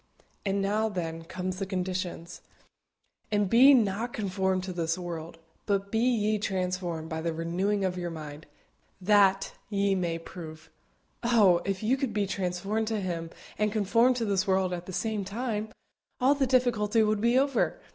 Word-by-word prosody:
And 195 0 +1
now, 215 +3 +1
then, 165 -4 -4
comes 185 +2 -4
the 195 - -3
conditions: 180 -2 -4 0.9
"And 205 -1 +2
be 260 +7 +7
not 225 +1 0
conformed 190 -2 -1
to 185 -1 -5
this 165 -1 -1
world: 170 -2 -6 0.3
but 200 -1 0
be 225 - +1
ye 215 -3 +2
transformed 180 -4 -2
by 160 -1 -4
the 165 0 -1
renewing 190 +5 0
of 180 -1 -2
your 175 -1 -3
mind, 155 -2 -8 0.5
that 195 0 +3 0.2
ye 200 -1 +1
may 175 -3 -1
prove." 160 -2 -10 0.5
Oh! 210 -8 +4
if 195 +1 -2
you 250 +5 +2
could 260 -5 -2
be 205 -1 +1
transformed 195 +3 -2
to 220 -1 -1
Him 170 -4 -3 0.3
and 210 0 +2
conformed 230 +4 +3
to 235 -2 -1
this 200 -1 0
world 190 -1 +2
at 175 0 -6
the - - -6
same 215 +2 -2
time, 215 +1 -3 0.5
all 260 +3 +4
the 275 -2 0
difficulty 235 -4 +2
would 215 -1 +1
be 235 +2 +3
over. 275 - +1
195 Hz, 165 wpm, -28 LUFS, 180-220 Hz, 0.9 s, be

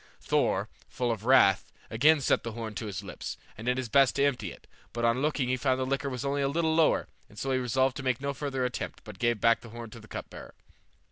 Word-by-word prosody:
Thor, - - +1 0.2
full 120 -2 -1
of 110 -1 -4
wrath, 125 -7 +5 0.2
again 145 +7 +4
set - - +2
the 115 - -5
horn 115 -1 -5
to 105 +2 -5
his 100 -5 -5
lips, - - -6 0.2
and 110 +3 -8
did 125 0 +2
his 130 -2 -2
best 135 +4 +4
to 140 - +2
empty 120 -10 -1
it; - - -14 0.3
but 120 0 -1
on 115 +2 +2
looking 145 -4 0
in 130 - 0
found 130 -1 +1
the 130 - 0
liquor 135 +1 -1
was 125 0 -4
only 140 +1 0
a 140 - +2
little 160 +3 +1
lower, 160 -1 +3 0.3
so 135 +5 -3
he 130 - +2
resolved 130 +1 +1
to 140 - -5
make 130 -2 0
no 140 +1 -2
further 135 -2 -2
attempt, 125 - -4
but 105 -4 -11
gave 120 -2 +1
back 115 +1 +4
the 115 - -11
horn 115 0 -8
to 115 - -10
the 110 - -14
cup - - -7
bearer. - - -11
125 Hz, 255 wpm, -29 LUFS, 115-140 Hz, 0.3 s, wrath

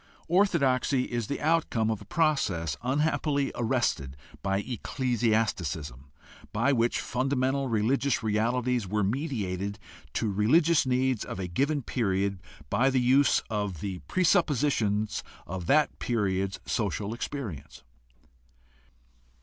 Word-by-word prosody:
Orthodoxy 140 -8 +2
is 120 -4 -3
the 140 - -3
outcome 150 -8 +1
of 110 - -3
a - - -11
process, 100 - 0
unhappily 145 +1 0
arrested 115 - -1 0.2
by 95 0 0
ecclesiasticism, 110 - -1 0.4
by 130 +6 +2
which 120 -1 +1
fundamental 135 +1 0
religious 120 +5 +1
realities 115 +1 0
were 105 +2 0
mediated 100 - -2 0.4
to 110 - 0
religious 150 - +3
needs 130 -2 +1
of - - -6
a 95 - -3
given 140 - 0
period 100 -5 -1 0.3
by 125 +6 +3
the 130 -1 +2
use 130 +2 +4
of 105 -6 -3
the 95 0 -4
presuppositions 140 - +1 0.2
of 90 +1 -6
that 150 0 +3
period's 95 -4 -1
social 105 -1 -2
experience. 115 - -6
115 Hz, 110 wpm, -28 LUFS, 100-135 Hz, 0.4 s, use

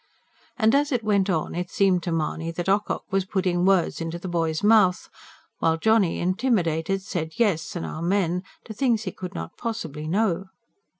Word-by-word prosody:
And 220 -3 +3
as 290 +1 +2
it 245 -4 0
went 200 -2 +2
on, 160 -4 -1
it 180 +1 -3
seemed 190 -3 +2
to 170 - -3
Mahony 165 0 -2
that 170 +2 -4
Ocock 200 +2 +1
was 195 0 +2
putting 185 -2 0
words 190 -3 +2
into 165 +1 -3
the 175 - -7
boy's 165 -2 -1
mouth; 205 -4 +4 0.5
while 165 0 +2
Johnny, 220 -1 +3
intimidated, 185 -3 0
said 160 -5 -4
yes 205 -4 0
and 170 - -3
amen 180 +1 0 0.2
to 220 - -7
things 230 -1 +1
he 185 - -4
could 185 +1 -8
not - - -6
possibly 160 - -4
know. 195 0 +1
185 Hz, 175 wpm, -25 LUFS, 165-210 Hz, 0.5 s, mouth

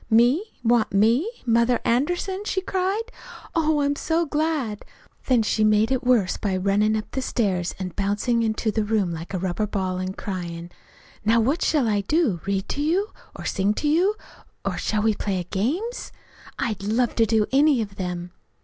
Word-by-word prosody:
"'Me? 240 - +4 0.2
Want 235 -1 +3
me? 230 - +3 0.2
Mother 235 +1 +3
Anderson?' 355 +10 0
she 390 - -1
cried. 380 +3 -1 0.5
'Oh, 310 -2 +2
I'm 285 0 +1
so 330 +3 0
glad!' 295 -8 -1 0.4
Then 245 -4 +4
she 215 0 +1
made 215 +2 +3
it 260 -1 0
worse 240 -7 +2
by 195 -3 -1
runnin' 205 +3 +2
up 215 - -4
the 265 - -2
stairs 190 -9 -1
an' 185 -1 -4
bouncin' 205 +5 0
into 220 0 0
the 220 0 0
room 210 -4 0
like 165 +1 -6
a 190 - -1
rubber 190 +3 -1
ball, 185 -2 -2
an' 185 0 -3
cryin': 175 -3 -5 0.5
'Now, 225 +2 +4
what 275 +10 +1
shall 290 -7 +2
I 205 -2 +1
do, 230 - +1
read 195 0 -1
to 285 - -2
you, 360 +8 +1 0.3
or - - -8
sing 200 +2 +1
to 300 - -1
you, 355 +8 +3 0.5
or - - -1
shall 210 -1 -1
we 220 0 +3
play 190 -3 -2
games? 320 - -2 0.5
I'd 215 -4 -2
love 225 +4 +1
to 225 -1 +4
do 220 -1 +3
any 280 0 +4
of 200 -1 -10
them!' 180 -1 -4
225 Hz, 180 wpm, -24 LUFS, 200-285 Hz, 0.5 s, Me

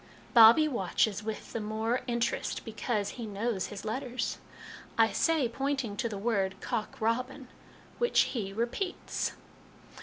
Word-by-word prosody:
Bobbie 235 +7 +8
watches 210 - 0
with 220 0 -5
the 230 - -1
more 220 +3 -1
interest 235 -1 -1
because 215 -2 -2
he 235 -3 -6
knows 205 -1 -2
his 205 -1 -8
letters. 250 +3 -3 0.6
I 225 -1 +5
say, 320 -6 +2
pointing 265 -3 -2
to 235 0 -1
the 205 - -5
word, 195 -3 0
' - - -22
cock 225 -3 -3
robin,' 250 +4 -1 0.5
which 480 0 +4
he 205 -6 -2
repeats. 240 - -2
230 Hz, 140 wpm, -30 LUFS, 215-255 Hz, 0.6 s, Bobbie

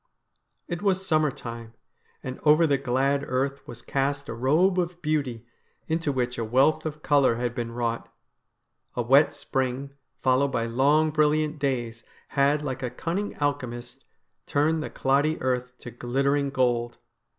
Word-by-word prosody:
It 175 -1 -4
was 190 -2 +1
summer 155 -4 +3
time, 115 -4 -8 0.5
and 130 -1 -6
over 155 +2 +5
the 140 -3 +2
glad 135 +2 +1
earth 135 +2 -1
was 120 0 -9
cast 140 +1 -1
a - - -3
robe 155 +10 +2
of 175 0 -2
beauty, 140 -7 -1 0.4
into 160 -2 0
which 125 -2 -2
a - - 0
wealth 135 +7 +2
of 150 0 -7
colour 140 -5 +4
had 120 0 -2
been 120 -1 -4
wrought. 115 -1 -3 0.8
A 120 - 0
wet 135 +5 +5
spring, 135 +1 -2 0.3
followed 130 +1 +3
by 115 -4 -1
long 145 +7 +3
brilliant 155 0 +1
days, 120 -5 -2 0.3
had, 145 +1 +2
like 130 -3 -4
a 125 - -2
cunning 170 +11 -3
alchemist, 120 -4 -3 0.4
turned 155 +2 +1
the - - -4
cloddy 145 +4 +1
earth 125 -1 -2
to 120 - -9
glittering 140 +4 0
gold. 120 -3 0
135 Hz, 150 wpm, -26 LUFS, 125-150 Hz, 0.8 s, over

